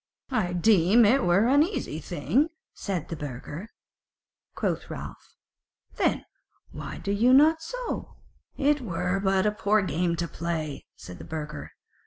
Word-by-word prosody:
"I 180 -9 0
deem 200 +4 +5
it 255 +6 +4
were 175 +5 +4
an 280 +4 +5
easy 315 - -1
thing," 185 - 0 0.2
said 185 -6 -4
the 165 - -3
burgher. 150 - -7 0.9
Quoth - - -2
Ralph: - - -9 0.6
"Then - - +1 0.5
why - - -7
do 200 - -3
ye 225 +5 +3
not 310 +4 +6
so?" - - -5 0.4
"It 290 +1 +2
were 180 -2 -1
but 195 0 +2
a 210 - +3
poor 210 0 +2
game 170 -1 0
to 170 0 -2
play," 160 -3 -4
said 90 - -11
the - - -8
burgher. 150 -2 -6
195 Hz, 145 wpm, -27 LUFS, 165-250 Hz, 0.9 s, not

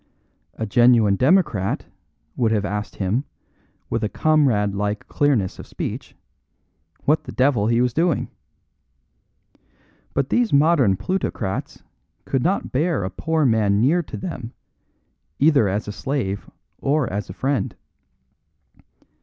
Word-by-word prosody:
A 110 - -3
genuine 115 -2 +4
democrat 130 - +2 0.5
would 115 -3 +1
have 105 -2 +1
asked 105 +2 -4
him, 105 +7 -1 0.6
with 110 - -2
comrade 130 -11 +2
like 105 +1 -3
clearness 130 -11 0
of - - -9
speech, - - -6 0.9
what 150 +2 +2
the - - -7
devil 125 -6 +2
he 115 +1 +2
was 125 -1 +1
doing. 165 +1 +1 1.9
But 140 -1 0
these 245 -3 +2
modern 140 - +4
plutocrats 110 - -3 0.4
could 135 - 0
not 185 +7 0
bear 155 - 0
a 95 - -3
poor 160 - 0
man 105 -4 +3
near 150 +10 +3
to 165 - -8
them, 130 -10 -6 0.8
either 145 -7 +4
as 100 +3 -2
a - - -3
slave 105 -4 -3 0.3
or 145 -2 +1
as 100 -2 -3
a - - -6
friend. 130 0 -1
125 Hz, 125 wpm, -22 LUFS, 105-145 Hz, 1.9 s, genuine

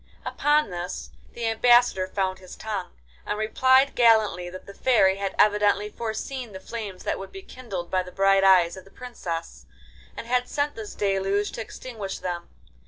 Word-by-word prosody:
Upon 295 -6 +2
this 175 0 -5 0.2
the 235 - -4
Ambassador 225 -3 +4
found 190 -1 -2
his 185 -1 -11
tongue, 210 -4 -5 0.3
and - - -3
replied 260 +5 +3
gallantly 220 -7 +3
that 185 +1 -10
the 200 - -11
Fairy 195 -6 +3
had 195 -1 -3
evidently 210 0 +3
foreseen 235 +1 -5
the 190 - -7
flames 200 -2 -7
that - - -2
would 195 - -8
be 385 - -10
kindled 200 - -7
by 185 - +2
the 180 0 -9
bright 195 0 +3
eyes 185 -3 +5
of 190 - -10
the - - -18
Princess, 170 - -7 0.5
and - - -6
had 250 +1 0
sent 290 0 -1
this 220 -2 -8
deluge 195 0 0
to - - -5
extinguish 220 -3 -7
them. 175 -1 -5
205 Hz, 170 wpm, -25 LUFS, 190-235 Hz, 0.5 s, eyes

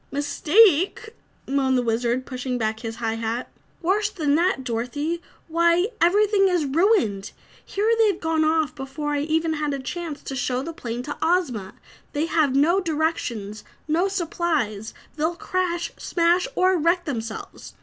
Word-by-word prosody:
"Mistake!" 345 - +3 0.3
moaned 265 -1 +2
the 250 - +1
Wizard, 240 +2 0
pushing 255 -1 -3
back 220 -1 -1
his 225 -1 -5
high 225 -1 -2
hat. 230 +2 -3 0.3
"Worse 405 +4 +2
than 305 -8 0
that, 335 -3 +2
Dorothy! 260 +8 -2 0.3
Why, 340 +4 +3
everything 400 +3 +4
is 355 -5 +1
ruined! 285 - +1 0.3
Here 420 +3 0
they've 415 -5 +3
gone 320 -1 +1
off 310 -3 +1
before 275 +3 -5
I 290 - 0
even 320 +2 0
had 300 -2 -1
a - - -5
chance 320 +2 -5
to 270 - -5
show 250 0 -1
the 330 - -6
plane 240 -4 -5
to 290 - -5
Ozma. 260 - 0 0.4
They 300 +1 0
have 310 -5 +1
no 330 +7 +4
directions, 295 - -2 0.2
no 335 +5 +2
supplies; 320 - -2 0.2
they'll 320 +3 0
crash, 350 -1 -2
smash 345 +4 +2
or 370 0 +3
wreck 340 +3 +2
themselves. 225 -6 -6
310 Hz, 150 wpm, -24 LUFS, 255-345 Hz, 0.4 s, everything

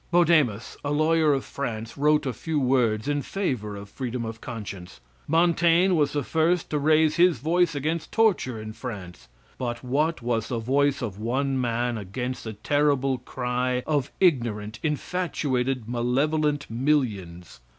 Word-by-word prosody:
Bodemus, 155 -11 +2
a 145 - -2
lawyer 155 +1 +3
of 135 -2 0
France, 115 -4 -5
wrote 150 +1 +2
a 130 - -1
few 155 +7 -2
words 125 -3 +1
in 145 0 0
favor 125 - -3
of 100 0 -8
freedom 120 +1 -4
of 115 0 -7
conscience. 100 - -7 0.3
Montaigne 170 +2 +4
was 150 -4 +2
the 145 -1 0
first 165 +5 +1
to 150 - +1
raise 155 +1 +3
his 175 -3 +5
voice 165 +5 +1
against 155 +4 -2
torture 195 - +2
in 110 0 -7
France; 100 -9 -8 0.3
but 120 -1 -3
what 145 +3 0
was 115 -2 -1
the 120 - -2
voice 140 +4 +1
of 105 -4 -5
one 130 +4 0
man 120 -1 -1
against 125 +7 -5
the 110 - -5
terrible 135 +3 +1
cry 125 0 -2
of 145 -3 0
ignorant, 115 - +1
infatuated, 135 -6 -1
malevolent 140 +5 0
millions! 110 - -1
130 Hz, 150 wpm, -25 LUFS, 115-155 Hz, 0.3 s, his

